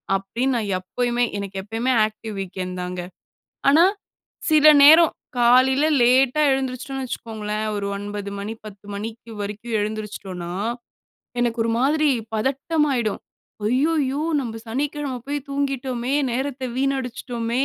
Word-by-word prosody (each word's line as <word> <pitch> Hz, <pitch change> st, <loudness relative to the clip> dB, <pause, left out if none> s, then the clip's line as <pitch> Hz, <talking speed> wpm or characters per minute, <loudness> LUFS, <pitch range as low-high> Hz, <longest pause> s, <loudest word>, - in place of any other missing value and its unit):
அப்டின்னு 235 Hz, +7 st, -1 dB
நான் 220 Hz, -4 st, -1 dB
எப்பயுமே 240 Hz, +6 st, -1 dB
எனக்கு 200 Hz, -1 st, -5 dB
எப்பவுமே 225 Hz, +5 st, -1 dB
ஆக்டிவ் 215 Hz, 0 st, -7 dB
வீக்கெண்ட் 185 Hz, -1 st, -5 dB
தாங்க. 180 Hz, 0 st, -4 dB, 0.7 s
ஆனா, 310 Hz, +5 st, +7 dB, 0.7 s
சில 310 Hz, -1 st, +6 dB, 0.2 s
நேரம் 320 Hz, +3 st, +8 dB, 0.3 s
காலைல 255 Hz, +4 st, +5 dB, 0.2 s
லேட்டா 255 Hz, +4 st, +4 dB
எழுந்திருச்சுட்டோம்ன்னா 265 Hz, +1 st, -2 dB
வெச்சுக்கோங்களேன், 215 Hz, -3 st, -4 dB
ஒரு 200 Hz, -1 st, -2 dB
9 205 Hz, 0 st, -5 dB
மணி 205 Hz, +2 st, -4 dB
10 205 Hz, -2 st, -11 dB
மணிக்கு 225 Hz, +3 st, -7 dB
வரைக்கும் 210 Hz, +3 st, -3 dB
எழுந்திருச்சுட்டோம்ன்னா, 205 Hz, -4 st, -5 dB, 0.9 s
எனக்கு 240 Hz, -1 st, 0 dB
ஒரு 230 Hz, -, 0 dB
மாதிரி 300 Hz, +3 st, +3 dB, 0.3 s
பதட்டம் 275 Hz, +7 st, 0 dB
ஆயிடும். 235 Hz, -5 st, -1 dB, 0.5 s
அய்யய்யோ 280 Hz, +3 st, +1 dB, 0.2 s
நம்ம 225 Hz, -4 st, -5 dB
சனிக்கெழம 280 Hz, +3 st, -2 dB
போய் 290 Hz, +1 st, -1 dB
தூங்கிட்டோமே, 270 Hz, -2 st, -2 dB, 0.2 s
நேரத்த 265 Hz, +1 st, -3 dB
வீணடிச்ட்டோமே, 250 Hz, -2 st, -1 dB
240 Hz, 115 wpm, -23 LUFS, 210-270 Hz, 0.9 s, நேரம்